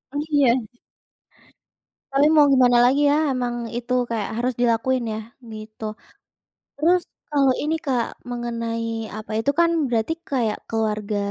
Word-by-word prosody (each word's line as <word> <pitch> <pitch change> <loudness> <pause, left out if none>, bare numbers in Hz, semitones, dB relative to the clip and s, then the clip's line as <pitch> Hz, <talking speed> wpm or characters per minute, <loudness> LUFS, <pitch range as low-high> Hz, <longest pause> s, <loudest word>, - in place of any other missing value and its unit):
Oh, - - 0
iya. 260 -4 +3 1.5
Tapi 285 +3 +4
mau 305 -2 +6
gimana 250 -2 +5
lagi 285 +3 +4
ya 290 - +3 0.2
emang 240 -2 -2
itu 240 +1 -3 0.2
kayak 220 -3 -2
harus 250 +2 0
dilakuin 240 +2 +1
ya? - - -4 0.3
Gitu. 215 +1 -10 0.9
Terus 345 +5 +2 0.3
kalau 275 -3 +3
ini, 310 +2 0
Kak, 250 -4 -1
mengenai 230 -2 -4
apa 215 0 -7
itu 225 +6 +1
kan 340 0 +5 0.2
berarti 235 +3 0 0.2
kayak 235 -6 -1
keluarga 215 -2 -2
245 Hz, 135 wpm, -22 LUFS, 225-275 Hz, 1.5 s, mau